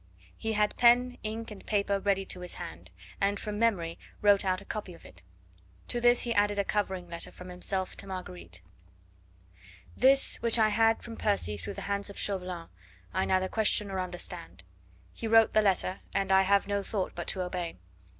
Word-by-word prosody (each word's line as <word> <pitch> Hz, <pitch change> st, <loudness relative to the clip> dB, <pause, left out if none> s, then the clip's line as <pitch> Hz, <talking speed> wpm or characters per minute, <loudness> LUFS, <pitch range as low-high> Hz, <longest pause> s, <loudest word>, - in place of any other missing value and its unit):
He 220 Hz, 0 st, -3 dB
had 210 Hz, -1 st, +1 dB
pen, 245 Hz, +1 st, +4 dB
ink 220 Hz, +1 st, -5 dB
and 205 Hz, -, -10 dB
paper 200 Hz, -1 st, 0 dB
ready 195 Hz, -1 st, +1 dB
to 180 Hz, -, -4 dB
his 180 Hz, -1 st, -4 dB
hand, 85 Hz, +3 st, -8 dB, 0.3 s
and 200 Hz, 0 st, +1 dB
from 210 Hz, 0 st, -4 dB
memory 180 Hz, -8 st, +1 dB, 0.2 s
wrote 205 Hz, -1 st, +5 dB
out 185 Hz, -1 st, +1 dB
a 200 Hz, -, -13 dB
copy 195 Hz, -5 st, -5 dB
of -, -, -18 dB
it. 90 Hz, -1 st, -15 dB, 0.7 s
To 240 Hz, -, -1 dB
this 240 Hz, 0 st, +5 dB
he 235 Hz, -, -1 dB
added 205 Hz, -1 st, +2 dB
a 200 Hz, -, +2 dB
covering 190 Hz, -3 st, -2 dB
letter 170 Hz, 0 st, -4 dB
from 180 Hz, 0 st, -11 dB
himself 185 Hz, +1 st, -3 dB
to -, -, -8 dB
Marguerite: 90 Hz, -, -8 dB, 1.3 s
This 270 Hz, +2 st, +5 dB
which 230 Hz, 0 st, +2 dB
I 220 Hz, -1 st, +4 dB
had 225 Hz, +1 st, +3 dB
from 230 Hz, -1 st, -8 dB
Percy 200 Hz, -, +1 dB
through 195 Hz, -, -7 dB
the -, -, -6 dB
hands 200 Hz, 0 st, -2 dB
of 200 Hz, -, -10 dB
Chauvelin 180 Hz, -4 st, -3 dB, 0.4 s
I 190 Hz, +2 st, +1 dB
neither 185 Hz, 0 st, +2 dB
question 210 Hz, -1 st, +1 dB
nor 190 Hz, -1 st, -3 dB
understand.... 95 Hz, -, -7 dB, 0.5 s
He 230 Hz, -, -5 dB
wrote 225 Hz, 0 st, +5 dB
the 215 Hz, -, +5 dB
letter, 190 Hz, -2 st, +1 dB, 0.2 s
and 195 Hz, -1 st, +1 dB
I 190 Hz, 0 st, +7 dB
have 200 Hz, +1 st, +3 dB
no 200 Hz, 0 st, 0 dB
thought 195 Hz, -1 st, -2 dB
but 175 Hz, -, -6 dB
to 185 Hz, -, -1 dB
obey. 180 Hz, -2 st, -4 dB
200 Hz, 190 wpm, -29 LUFS, 180-215 Hz, 1.3 s, I